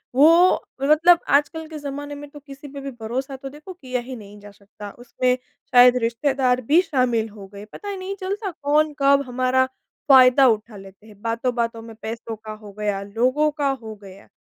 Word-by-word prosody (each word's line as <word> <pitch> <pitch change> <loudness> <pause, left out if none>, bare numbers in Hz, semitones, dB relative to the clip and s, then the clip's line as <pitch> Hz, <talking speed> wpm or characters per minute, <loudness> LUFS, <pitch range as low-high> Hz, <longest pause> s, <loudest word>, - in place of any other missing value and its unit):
वो 335 +6 +5 0.2
मतलब, 320 +5 +5
आजकल 310 +3 +1
के 315 - -8
ज़माने 290 0 -6
में 290 0 -10
तो 295 - -12
किसी 280 0 -12
पे 280 - -8
भी 275 - -6
भरोसा 260 +5 -4
तो 270 +1 -8
देखो 300 +7 -11
किया 255 -7 -4
ही 255 +1 -8
नहीं 205 -2 -12
जा 205 0 -13
सकता। 205 0 -12
उसमें 250 +1 0 0.4
शायद 250 0 +7
रिश्तेदार 255 +1 0
भी 300 +9 +4
शामिल 250 -8 0
हो 200 -2 -12
गए। 200 - -9
पता 405 - -9
ही 400 - -4
नहीं 380 +1 -5
चलता 390 +1 -4
कौन 300 0 0
कब 280 0 +4
हमारा 255 +1 +1 0.4
फ़ायदा 260 0 +7
उठा 220 -2 -1
लेते 195 +2 -15
हैं। 205 -2 -17
बातों-बातों 230 0 -2
में 225 -1 -11
पैसों 230 0 -6
का 215 0 -10
हो 215 -1 -12
गया, 205 -2 -1
लोगों 250 +9 +1
का 290 -2 -1
हो 225 -5 -5
गया। 195 0 -14
255 Hz, 190 wpm, -22 LUFS, 225-290 Hz, 0.4 s, शायद